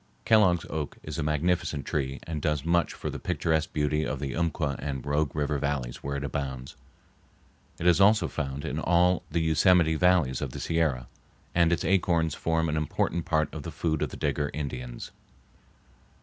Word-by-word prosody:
Kellogg's 95 Hz, -6 st, +4 dB
oak 80 Hz, -2 st, -4 dB
is 75 Hz, 0 st, -5 dB
a -, -, +1 dB
magnificent 75 Hz, -1 st, 0 dB
tree 70 Hz, -2 st, -2 dB
and 80 Hz, -2 st, -4 dB
does 75 Hz, -1 st, -1 dB
much 85 Hz, 0 st, +2 dB
for -, -, -4 dB
the -, -, -6 dB
picturesque 80 Hz, -1 st, 0 dB
beauty 75 Hz, 0 st, 0 dB
of 70 Hz, -, -3 dB
the 70 Hz, -1 st, -4 dB
Umpqua 80 Hz, -4 st, -1 dB
and 70 Hz, -2 st, -4 dB
Rogue 75 Hz, 0 st, 0 dB
River 75 Hz, -1 st, 0 dB
Valleys 70 Hz, -4 st, -2 dB
where 70 Hz, 0 st, -4 dB
it 70 Hz, -, -3 dB
abounds. 65 Hz, -2 st, -4 dB, 1.0 s
It -, -, -5 dB
is 90 Hz, +2 st, +5 dB
also 105 Hz, +2 st, +5 dB
found 70 Hz, -2 st, -4 dB
in -, -, -2 dB
all 90 Hz, +1 st, +3 dB
the 85 Hz, +2 st, 0 dB
Yosemite 80 Hz, +1 st, +4 dB
valleys 80 Hz, -6 st, +2 dB
of 65 Hz, -4 st, -4 dB
the -, -, -6 dB
Sierra, 75 Hz, -7 st, 0 dB, 0.5 s
and 85 Hz, -1 st, +3 dB
its 85 Hz, -3 st, 0 dB
acorns 85 Hz, -3 st, +2 dB
form 80 Hz, +1 st, 0 dB
an 80 Hz, 0 st, -1 dB
important 80 Hz, +2 st, -1 dB
part 80 Hz, -3 st, 0 dB
of -, -, -5 dB
the -, -, -6 dB
food 80 Hz, -3 st, -2 dB
of -, -, 0 dB
the -, -, -9 dB
Digger 75 Hz, -1 st, -1 dB
Indians. 65 Hz, -5 st, -5 dB
75 Hz, 180 wpm, -27 LUFS, 70-85 Hz, 1.0 s, is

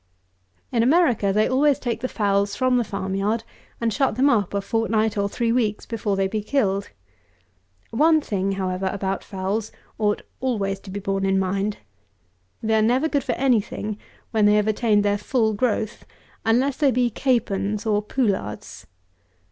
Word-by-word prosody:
In 235 Hz, -, +2 dB
America 245 Hz, -, +3 dB
they 215 Hz, +2 st, +2 dB
always 275 Hz, +2 st, +3 dB
take 235 Hz, -3 st, -3 dB
the 255 Hz, -, -1 dB
fowls 200 Hz, -3 st, 0 dB
from 255 Hz, +2 st, +2 dB
the 240 Hz, -, +2 dB
farm 195 Hz, -2 st, -4 dB
yard, 210 Hz, +4 st, 0 dB, 0.4 s
and 230 Hz, -2 st, 0 dB
shut 270 Hz, -2 st, +1 dB
them 275 Hz, +3 st, +4 dB
up 205 Hz, -5 st, +1 dB
a -, -, +2 dB
fortnight 220 Hz, +1 st, 0 dB
or 200 Hz, -1 st, 0 dB
three 230 Hz, +2 st, 0 dB
weeks 220 Hz, -4 st, 0 dB
before 215 Hz, -3 st, -2 dB
they 195 Hz, 0 st, +1 dB
be 215 Hz, +2 st, -2 dB
killed. 205 Hz, -4 st, 0 dB, 1.0 s
One 315 Hz, +6 st, +4 dB
thing, 195 Hz, -8 st, -2 dB
however, 190 Hz, 0 st, -2 dB
about 195 Hz, -1 st, -3 dB
fowls 200 Hz, +2 st, -3 dB, 0.3 s
ought 210 Hz, -1 st, 0 dB, 0.2 s
always 200 Hz, -7 st, -1 dB
to 195 Hz, -, -13 dB
be 200 Hz, +2 st, -4 dB
borne 195 Hz, 0 st, -2 dB
in 195 Hz, 0 st, +2 dB
mind. 195 Hz, +2 st, -1 dB, 0.9 s
They 220 Hz, 0 st, +1 dB
are 220 Hz, -, +4 dB
never 250 Hz, +7 st, +2 dB
good 285 Hz, -4 st, 0 dB
for -, -, -1 dB
any 250 Hz, -5 st, +3 dB
thing 210 Hz, +1 st, -6 dB, 0.3 s
when 215 Hz, -2 st, +3 dB
they 210 Hz, -, +5 dB
have 210 Hz, 0 st, +2 dB
attained 215 Hz, -1 st, +2 dB
their 205 Hz, 0 st, +1 dB
full 220 Hz, 0 st, +1 dB
growth, 215 Hz, 0 st, -1 dB, 0.4 s
unless 250 Hz, +5 st, +2 dB
they 290 Hz, -3 st, +3 dB
be 245 Hz, -2 st, +1 dB
capons 210 Hz, -4 st, 0 dB
or 210 Hz, -1 st, +2 dB
poullards. 205 Hz, -, -3 dB
215 Hz, 170 wpm, -23 LUFS, 200-240 Hz, 1.0 s, they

